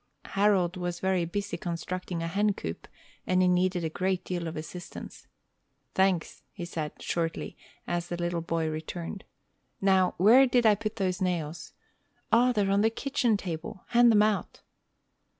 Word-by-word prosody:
Harold 195 -3 +2
was 175 -1 -3
very 190 -2 +1
busy 200 +4 -3
constructing 175 -1 -4
a - - -2
hen 205 +3 +1
coop, 80 +1 -6 0.4
and 185 0 +3
he - - +4
needed 180 0 +2
a - - +1
great 185 +3 -1
deal 175 -2 -3
of 160 - -5
assistance. 175 +3 -8 0.7
"Thanks," 190 -3 +1
he 175 - -6
said, 155 -3 -5
shortly, 165 -1 -3 0.3
as 175 0 -2
the 175 - -4
little 175 -1 -1
boy 165 -1 -1
returned. 165 +4 -5 0.5
"Now, 190 -2 +3
where 235 +9 +7
did 245 -1 +2
I 215 - +7
put 215 +1 -3
those 185 -3 -1
nails? 170 -3 -2 0.6
O, 245 +2 +5
they're 205 -4 +1
on 200 +1 +3
the 220 - +4
kitchen 245 -2 0
table! 190 +3 -6
Hand 240 0 +6
them 210 -1 +5
out." 215 -1 -1
185 Hz, 160 wpm, -28 LUFS, 170-205 Hz, 0.7 s, where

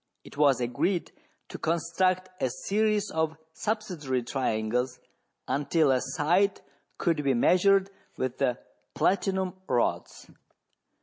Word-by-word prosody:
It - - -13
was 140 -3 +4
agreed 125 +10 -1 0.4
to - - -7
construct 180 +3 0
a 130 - +2
series 210 - 0
of 160 0 -1 0.2
subsidiary 175 - -2
triangles 125 0 -1 0.5
until 145 +1 +2
a 130 -1 +2
side 170 +9 +1 0.4
could 160 -3 0
be 135 -2 +2
measured 195 +8 +4 0.3
with 130 -1 -3
the 125 -3 +1 0.4
platinum 190 -1 +1 0.2
rods. 120 - -1
160 Hz, 110 wpm, -28 LUFS, 130-190 Hz, 0.5 s, was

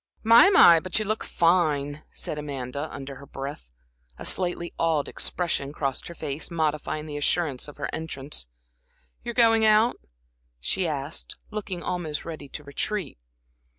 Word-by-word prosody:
"My, 230 - +8
but 185 +2 -1
you 215 - +1
look 215 +2 -1
fine!" 155 -4 +2
said 150 - -4
Amanda, 140 0 -4
under 135 -1 -7
her 140 +1 -12
breath. 135 - -7 0.5
A - - -8
slightly 175 -2 -1
awed 160 -3 +2
expression 160 -6 -2
crossed 135 -3 -2
her 170 - -8
face, 150 -1 -4
modifying 155 -2 -1
the 150 -1 -5
assurance 145 -3 +1
of 145 - -11
her - - -2
entrance. 140 - -4 0.8
"You're 235 - -5
going 225 -2 +5
out?" 215 +2 +5 0.6
she 175 - 0
asked, 145 0 -3 0.2
looking 200 -4 -4
almost 160 -5 -3
ready 155 -4 -7
to 150 - -7
retreat. 145 - -3
155 Hz, 145 wpm, -26 LUFS, 140-180 Hz, 0.8 s, My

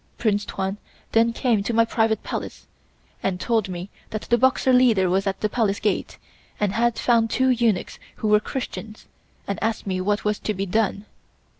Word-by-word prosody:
Prince 205 -3 +1
Tuan 195 +1 -3 0.3
then 230 +1 +4
came 230 -3 +1
to 225 +3 -2
my 230 0 +5
private 225 -1 +1
Palace - - -5 0.6
and 185 -2 -1
told 225 -4 0
me 180 +2 -6 0.2
that 215 - -4
the 240 - +2
Boxer 260 0 +3
leader 225 -8 +4
was 195 +2 +1
at 195 - -2
the 215 - +2
Palace 210 -2 0
Gate 210 -3 -1 0.4
and 205 -2 +1
had 235 0 +1
found 230 -2 +2
two 260 +3 +2
eunuchs 235 -6 +1 0.2
who 215 - -3
were 210 0 +5
Christians 220 -2 -6 0.4
and 200 - -3
asked 225 +1 -1
me 185 -2 -1
what 205 +3 0
was 210 0 0
to 215 - -2
be 195 +1 -2
done. 205 +1 0
215 Hz, 185 wpm, -23 LUFS, 200-230 Hz, 0.6 s, my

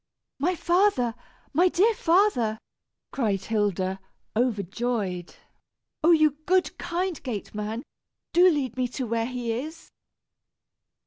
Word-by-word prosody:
"My 355 +6 +1
father! 345 - +2 0.4
My 350 +5 +5
dear 415 +7 +3
father!" 330 - +2 0.5
cried 205 -7 0
Hilda, 195 -3 0 0.4
overjoyed. 210 -4 -1 0.7
"Oh! 325 - +5
you 310 -4 +5
good, 370 0 +2
kind 355 0 -2
gateman, 215 -1 -4 0.5
do 355 +2 +7
lead 270 -7 -1
me 255 -1 +1
to 260 - -1
where 230 0 -1
he 245 -2 -3
is." 305 +8 -6
250 Hz, 110 wpm, -26 LUFS, 220-340 Hz, 0.7 s, do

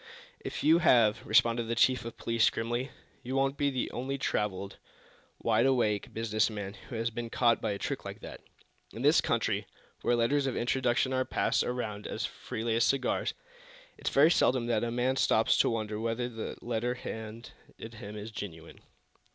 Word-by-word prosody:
"If - - -5
you 160 +2 +6
have," 115 -9 +4
responded 115 +1 +3
the 115 +1 -2
chief 125 +1 +3
of 115 - -7
police, 115 -1 +2
grimly, 120 +4 -2 0.3
"you 130 +1 -4
won't 135 0 +1
be 145 0 +1
the 130 -2 -2
only 135 +3 -3
traveled, 100 -6 -2 0.6
wide 120 - +2
awake 110 -6 +1
business 110 -1 +1
man 100 -2 -5 0.2
who 120 - -6
has 115 +1 -1
been 115 0 -5
caught 120 0 +2
by 110 - -1
a 100 - -2
trick - - -4
like - - -7
that. - - -9 0.5
In - - -6
this - - +5
country, - - 0 0.3
where 120 - +2
letters 135 +4 +2
of 130 - -2
introduction 130 +1 +1
are 130 0 +2
passed - - +1
around 110 -4 -3
as - - -3
freely 115 0 -3
as 115 - +3
cigars, 135 0 +1 0.6
it's - - -3
very 150 +4 +5
seldom 130 -7 +3
that 115 -2 +1
a 120 - -1
man 125 +3 0
stops 110 -3 +3
to - - +4
wonder 110 -2 -2
whether 115 +2 -1
the 115 -2 -6
letter 120 +1 -1
handed 110 -1 -7 0.2
him 110 -2 -9
is 105 +2 -7
genuine." 85 -6 -8
115 Hz, 180 wpm, -30 LUFS, 110-125 Hz, 0.6 s, you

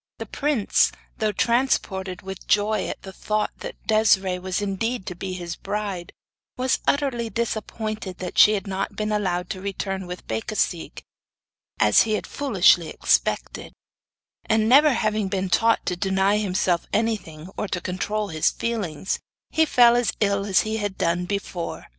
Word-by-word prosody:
The - - -5
prince, 285 -8 +1 0.3
though 215 -2 +1
transported 195 -6 0
with 190 -1 -8
joy 210 0 +2
at - - -6
the 190 0 -9
thought 215 +3 -1
that - - -9
Desiree 195 -4 +3
was 185 0 -2
indeed 205 +2 -2
to - - -4
be 185 +1 -5
his 175 -2 -5
bride, 200 -3 -4 0.5
was 255 +1 +1
bitterly 265 -5 0
disappointed 215 -3 -3
that 180 -1 -6
she 215 - +7
had 205 -1 -2
not 195 +1 -3
been 215 +1 -2
allowed 180 -4 -1
to 185 - -5
return 195 -1 -4
with 180 0 -7
Becasigue, 165 - -2 0.8
as 105 0 +6
he 220 - +1
had 215 - -1
foolishly 190 - +3
expected; - - 0 0.7
and 220 0 +2
never 290 +5 +7
having 215 -3 0
been 190 -1 -2
taught 230 +4 +3
to 180 - -1
deny 190 +2 +2
himself 185 -3 0
anything 200 -7 -2
or 210 - -3
to 180 - -2
control 200 +4 -2
his 155 -2 +2
feelings, 200 -7 -3 0.3
he 320 - +3
fell 240 -3 +6
as 240 -3 +1
ill 200 -1 +1
as 190 -2 +4
he 220 0 -2
had 205 -3 -3
done 170 +1 0
before. 190 -3 -4
200 Hz, 160 wpm, -24 LUFS, 185-220 Hz, 0.8 s, she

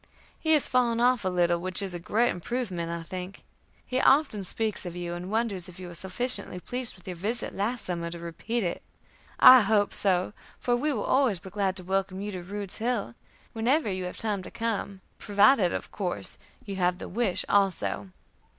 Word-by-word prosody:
He 315 -1 +2
has 300 - +3
fallen 240 -2 +2
off 245 -1 +3
a 190 - +1
little, 175 -1 +2
which 185 0 -1
is 195 -2 -2
a 175 - -4
great 225 +7 +1
improvement, 180 -4 -3
I 170 0 -4
think. 185 +2 -7 0.4
He 255 +1 0
often 270 -8 +3
speaks 215 +3 -1
of 175 -2 -6
you, 175 -1 -4
and 175 +2 -6
wonders 205 -5 -1
if 180 +1 -13
you 185 - -7
were - - -9
sufficiently 190 +3 0
pleased 250 +5 -2
with 185 - -19
your 180 - -4
visit 215 +8 -2
last 225 +5 -1
summer 170 -2 -3
to 170 - -7
repeat 170 +8 -3
it. 175 - -2 0.6
I 255 -1 +10
hope 205 0 +2
so, 185 -1 +1 0.3
for 245 - +1
we 295 +5 0
will - - -2
always 260 -9 +3
be 190 0 -11
glad 195 -2 0
to 185 - -2
welcome 190 +1 -1
you 205 +1 -4
to 185 -2 -5
Rude's 200 +2 -5
Hill, 225 - -1 0.4
whenever 235 +2 +1
you 185 -1 -3
have 180 - -6
time 210 -3 -1
to - - -9
come; 210 -4 -3 0.2
provided, 205 -2 +4
of - - -4
course, 175 - -3 0.3
you 195 -2 -5
have 180 -1 +1
the - - -7
wish 215 -2 -1
also. 195 -1 +1
195 Hz, 200 wpm, -27 LUFS, 180-230 Hz, 0.6 s, I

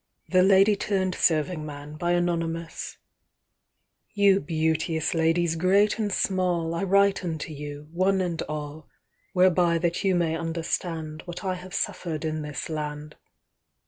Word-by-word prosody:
The 185 -1 +4
Lady 195 +2 +5
turned 190 -2 -1
Serving 160 0 +1
Man 145 0 -8
IYOU 170 -1 -1 1.5
beauteous 160 0 0
ladies 165 0 +2
great 195 +6 +3
and 210 -2 0
small,I 175 -4 0
write 200 0 +3
unto 160 -2 -4
you, 145 0 -8
one 190 +3 +2
and 175 -3 -1
all, 150 0 -6 0.4
Whereby 180 -2 +4
that 170 0 -1
you 190 -2 +3
may 170 -2 +1
understandWhat 165 0 -4
I 190 -1 0
have 185 0 -8
suffer'd 160 -3 -2
in 155 0 -2
this 150 -3 -5
land. 150 -1 -5
170 Hz, 120 wpm, -26 LUFS, 155-185 Hz, 1.5 s, Lady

